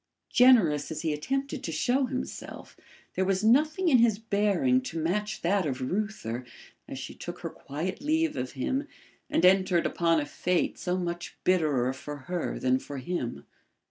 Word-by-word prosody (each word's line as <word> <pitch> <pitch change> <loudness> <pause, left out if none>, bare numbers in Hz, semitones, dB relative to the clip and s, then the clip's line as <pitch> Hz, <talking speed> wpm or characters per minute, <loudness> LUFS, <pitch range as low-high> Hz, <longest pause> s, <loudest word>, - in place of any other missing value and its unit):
Generous 220 - +5
as 160 0 -5
he 160 -2 0
attempted 270 - -3
to 165 - -3
show 250 - +1
himself, 255 -1 -6 0.4
there 190 - 0
was 190 +1 0
nothing 305 +10 +3
in 265 -7 +6
his 230 -3 +4
bearing 220 +4 +2
to 250 -9 -6
match 210 +7 -2
that 185 0 +2
of 130 -3 -3
Reuther 130 - -3 0.4
as - - -6
she - - -7
took - - -8
her - - -4
quiet 165 - -5
leave 315 +2 +1
of 125 0 -4
him 265 - -2 0.4
and 180 - +2
entered 185 -2 +4
upon 165 -1 +2
a 145 - -2
fate 180 +4 -1
so 180 0 -1
much 175 -1 -4
bitterer 150 -9 +2
for 145 +2 -7
her 175 +6 -3
than 130 0 +2
for 140 - -8
him. 130 -2 -4
185 Hz, 170 wpm, -28 LUFS, 150-235 Hz, 0.4 s, in